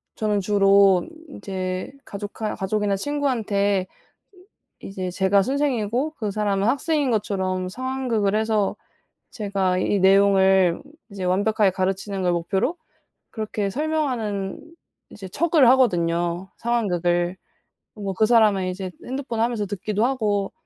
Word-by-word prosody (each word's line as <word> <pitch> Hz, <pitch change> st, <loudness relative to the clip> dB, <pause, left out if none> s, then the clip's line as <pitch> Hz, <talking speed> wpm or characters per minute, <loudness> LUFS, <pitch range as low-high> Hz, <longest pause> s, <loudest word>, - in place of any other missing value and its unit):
저는 210 Hz, -2 st, 0 dB
주로 195 Hz, -2 st, +4 dB, 0.2 s
인제 185 Hz, -7 st, -5 dB
가족하 205 Hz, +2 st, -5 dB
가족이나 200 Hz, +1 st, -1 dB
친구한테 205 Hz, -7 st, 0 dB, 0.9 s
이제 185 Hz, -2 st, -5 dB
제가 190 Hz, +2 st, +3 dB
선생이고 265 Hz, 0 st, -1 dB
그 210 Hz, -4 st, -3 dB
사람은 205 Hz, 0 st, 0 dB
학생인 285 Hz, +1 st, +1 dB
것처럼 190 Hz, -4 st, -1 dB
상황극을 245 Hz, -3 st, -1 dB
해서 215 Hz, -2 st, +1 dB, 0.6 s
제가 195 Hz, -4 st, -1 dB
이 200 Hz, -, +1 dB
내용을 190 Hz, -2 st, +4 dB, 0.3 s
이제 195 Hz, -2 st, -6 dB
완벽하게 200 Hz, +2 st, +2 dB
가르치는 190 Hz, +1 st, -2 dB
걸 180 Hz, -, +2 dB
목표로 190 Hz, -, -1 dB, 0.5 s
그렇게 215 Hz, -2 st, -3 dB
설명하는 250 Hz, -9 st, -2 dB, 0.5 s
이제 195 Hz, -2 st, -9 dB
척을 310 Hz, -, +3 dB
하거든요 175 Hz, -7 st, +1 dB
상황극을. 180 Hz, -6 st, 0 dB, 0.6 s
뭐 200 Hz, -2 st, -4 dB
그 215 Hz, -, +2 dB
사람은 215 Hz, -5 st, +4 dB
이제 185 Hz, 0 st, -5 dB, 0.2 s
핸드폰 255 Hz, -3 st, -4 dB
하면서 230 Hz, -3 st, 0 dB
듣기도 210 Hz, +3 st, -1 dB
하고 210 Hz, -7 st, -1 dB
200 Hz, 285 characters per minute, -23 LUFS, 190-230 Hz, 0.9 s, 주로